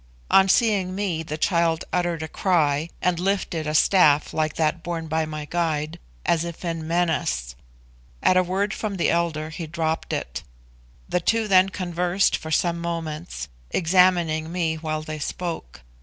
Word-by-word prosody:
On 195 0 +6
seeing 195 -4 +2
me 190 -5 -1
the 155 -1 -5
child 170 -1 +1
uttered 175 -3 0
a - - -4
cry, 155 -3 +1
and 180 -2 +1
lifted 180 -4 -1
a 155 - -1
staff 155 -4 +4
like 155 -1 0
that 160 +1 0
borne 165 -2 -4
by 160 0 0
my 155 -1 -5
guide, 155 -2 -2 0.3
as 165 -1 +2
if 170 +1 -7
in 165 -2 -3
menace. 145 - 0 0.7
At 185 - +5
a 185 - +6
word 195 +3 -1
from 205 -3 -3
the 170 - +2
elder 160 -2 -1
he 165 -1 -6
dropped 160 0 -2
it. 65 0 -3 0.7
The - - +1
two 225 +5 +1
then 190 -1 +5
conversed 180 0 0
for 160 - -6
some 170 +2 +1
moments, 165 - -4 0.2
examining 170 -3 +3
me 170 -3 0
while 155 -1 -3
they 155 0 -6
spoke. 160 - -5
170 Hz, 160 wpm, -24 LUFS, 155-180 Hz, 0.7 s, On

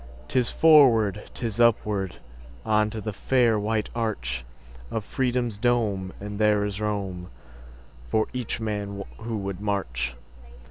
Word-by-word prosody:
'Tis 125 - +2
forward, 115 - +5
'tis 115 -2 -3
upward, 105 -5 +2 0.5
On 105 -1 +3
to 110 - -5
the 110 0 -4
fair 120 0 +2
white 105 +1 -1
archOf 65 - -2 0.6
Freedom's 120 -3 -1
dome, 105 -6 +1
and 105 0 -6
there 105 -1 +3
is 100 0 -4
roomFor 100 -4 -3 1.1
each 125 -3 -3
man 100 -2 -3 0.2
who 115 0 -3
would 100 -1 -4
march. 65 - -2
105 Hz, 120 wpm, -26 LUFS, 100-115 Hz, 1.1 s, forward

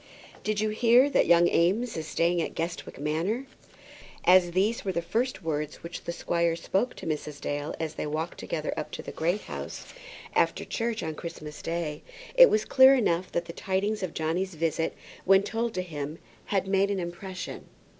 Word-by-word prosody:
"Did 215 -1 0
you 215 0 +1
hear 240 +5 +5
that - - +3
young 170 0 +6
Eames 200 +10 +2
is 160 -1 -4
staying 170 +1 +1
at - - -4
Guestwick 165 +1 -4
Manor?" 165 - -1 0.8
As 180 -1 +6
these 205 +5 +1
were 195 - -1
the 170 - -1
first 230 0 -1
words 150 -2 -3
which 170 +1 -7
the - - -2
squire 170 -1 0
spoke 195 +8 -1
to - - -9
Mrs. 150 -2 -3
Dale 145 +1 -3
as 160 -1 -3
they 150 - -4
walked 155 +3 -3
together 155 -2 -3
up - - -4
to - - -5
the - - -6
Great 175 +6 0
House, - - -7 0.4
after - - +1
church, 230 -1 -2
on 160 - -3
Christmas 155 -2 -8
Day, 165 -3 -3 0.3
it - - +9
was 215 0 +2
clear 265 +1 +7
enough 185 -7 +1
that 170 - -1
the 170 - -8
tidings 200 +4 -1
of 185 -3 -4
Johnny's 170 +4 -1
visit, 160 0 -1 0.3
when 195 +1 +5
told 225 +2 -2
to 185 - -1
him, 150 -2 -5 0.3
had 195 -2 0
made 195 +1 +2
some 200 - 0
impression. 185 +1 -6
175 Hz, 185 wpm, -28 LUFS, 160-210 Hz, 0.8 s, it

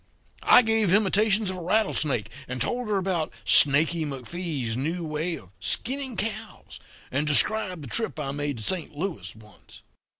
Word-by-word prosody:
I 250 - +6
gave 225 -4 +1
imitations 210 0 +2
of 185 - -7
a - - -7
rattlesnake, 155 - 0 0.2
and 125 0 -5
told 245 - -2
her 210 -2 0
about 180 -4 -2
Snaky 155 +4 +5
McFee's 140 -3 -5
new 165 +7 -3
way 155 +3 -3
of 95 - -14
skinning 260 - -1
cows, 220 +1 -5 0.3
and 145 +4 -1
described 180 +2 +3
the - - -8
trip 220 - -1
I 135 -2 -3
made 145 -2 -3
to 110 - -8
Saint 165 - -3
Louis 175 - -5
once. 105 -1 -17
170 Hz, 160 wpm, -25 LUFS, 140-205 Hz, 0.3 s, I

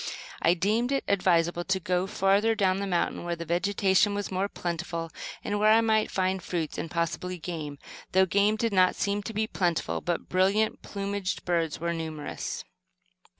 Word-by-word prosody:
I 170 +2 +4
deemed 215 +8 +1
it 275 - +1
advisable 175 -3 +2
to 190 0 +1
go 180 +1 0
further 205 +2 +2
down 190 -2 +2
the 200 - -2
mountain 175 -2 0
where 175 0 -2
the 170 0 -6
vegetation 195 +3 +2
was 205 -1 -3
more 190 +2 0
plentiful, 170 -2 -4 0.3
and 205 0 -1
where 215 +1 +5
I 225 +1 +6
might 220 -1 +2
find 185 0 0
fruits, 170 -3 -3
and 165 - -4
possibly 170 +2 -2
game 155 -4 -5 0.4
though 190 +1 +5
game 200 +3 +3
did 225 -1 -1
not 185 -1 +4
seem 200 0 0
to 205 - -6
be 220 0 0
plentiful, 175 -6 -1
but 175 -1 -2
brilliant 195 +4 +2
plumaged 200 -1 -3
birds 165 -3 0
were 170 +1 -1
numerous. 160 -2 -5
185 Hz, 175 wpm, -28 LUFS, 170-205 Hz, 0.4 s, I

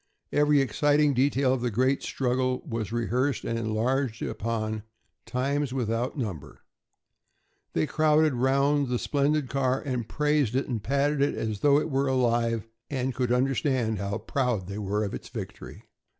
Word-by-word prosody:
Every 145 -1 +4
exciting 145 +4 +2
detail 135 0 +2
of 130 - -2
the 120 - 0
great 130 +5 +1
struggle 130 0 -1
was 115 -5 -3
rehearsed 120 +2 0
and 115 0 -1
enlarged 115 +2 -1
upon, 110 -1 -2 0.5
times 135 +1 -1
without 120 +2 -1
number. 100 - -5 1.1
They - - +1
crowded 155 -1 +3
round 140 +3 +2
the 125 0 0
splendid 145 +2 +1
car 130 0 0
and 125 -6 -3
praised 150 -5 +1
it 135 - 0
and 115 -5 -2
patted 140 +4 +1
it 145 - +2
as 110 -2 -3
though 145 +3 +5
it 155 - -3
were 135 +1 +1
alive 115 -3 +1 0.2
and 130 -2 -1
could 125 -1 -1
understand 125 -3 +1
how 100 0 -2
proud 125 -8 -1
they 100 +3 -6
were 105 +1 -1
of 100 - -3
its - - -7
victory. - - -8
130 Hz, 155 wpm, -27 LUFS, 115-140 Hz, 1.1 s, though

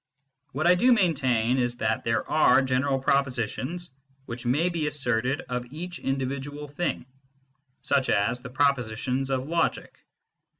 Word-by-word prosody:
What 155 +5 -1
I 175 - +7
do 245 +8 +4
maintain 130 - +2
is 120 -1 0
that 110 -1 -1
there 115 0 0
are 155 -3 +4
general 130 +1 +1
propositions 135 +5 -1 0.3
which 120 0 -6
may 145 +8 +2
be 165 -4 -2
asserted 130 -2 -1
of 125 0 -5
each 175 +4 -6
individual 140 +2 -3
thing, 145 -2 -3 0.8
such 130 - +1
as 115 +5 +1
the 125 - -8
propositions 130 -1 0
of 130 0 -1
logic. 170 +1 -1
135 Hz, 135 wpm, -26 LUFS, 125-150 Hz, 0.8 s, I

